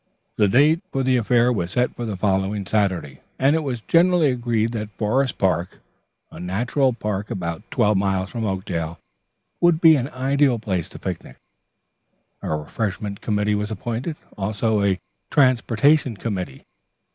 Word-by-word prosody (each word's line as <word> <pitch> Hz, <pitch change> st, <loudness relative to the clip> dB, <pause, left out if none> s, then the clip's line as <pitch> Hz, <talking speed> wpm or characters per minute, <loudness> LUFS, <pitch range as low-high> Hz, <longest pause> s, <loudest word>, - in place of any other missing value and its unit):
The 105 Hz, -, +3 dB
date 150 Hz, -, +4 dB
for 135 Hz, -, -1 dB
the 130 Hz, 0 st, +3 dB
affair 120 Hz, +1 st, +3 dB
was 90 Hz, -6 st, -2 dB
set 125 Hz, +6 st, 0 dB
for 120 Hz, -, -4 dB
the 105 Hz, -3 st, -4 dB
following 95 Hz, +1 st, 0 dB
Saturday, 100 Hz, -2 st, +1 dB
the -, -, -8 dB
weather -, -, -8 dB
permitting, 70 Hz, -, -8 dB
and 145 Hz, +3 st, +5 dB
it 160 Hz, -, +1 dB
was 125 Hz, -5 st, -3 dB
generally 170 Hz, 0 st, +4 dB
agreed 120 Hz, -2 st, 0 dB
that 110 Hz, -3 st, -4 dB
Forest 130 Hz, +5 st, 0 dB
Park, 90 Hz, -2 st, 0 dB, 0.5 s
a -, -, -10 dB
natural 115 Hz, +9 st, 0 dB
park 105 Hz, -3 st, -3 dB
about 85 Hz, -3 st, -4 dB
twelve 105 Hz, -1 st, +2 dB
miles 95 Hz, -1 st, 0 dB
from 115 Hz, -2 st, -4 dB
Oakdale, 85 Hz, -5 st, -3 dB, 0.6 s
would 175 Hz, -2 st, +4 dB
be 165 Hz, -2 st, +7 dB
an 135 Hz, -1 st, -1 dB
ideal 135 Hz, -1 st, +1 dB
place 95 Hz, -6 st, -3 dB
to -, -, -11 dB
picnic. 90 Hz, -3 st, -6 dB, 1.0 s
A -, -, -5 dB
refreshment 100 Hz, +6 st, -3 dB
committee 105 Hz, 0 st, 0 dB
was 105 Hz, 0 st, -1 dB
appointed, 120 Hz, -, -4 dB, 0.2 s
also 105 Hz, +1 st, 0 dB
a 95 Hz, -2 st, +1 dB, 0.3 s
transportation 130 Hz, 0 st, +3 dB
committee. 95 Hz, -, -4 dB
110 Hz, 160 wpm, -22 LUFS, 95-130 Hz, 1.0 s, be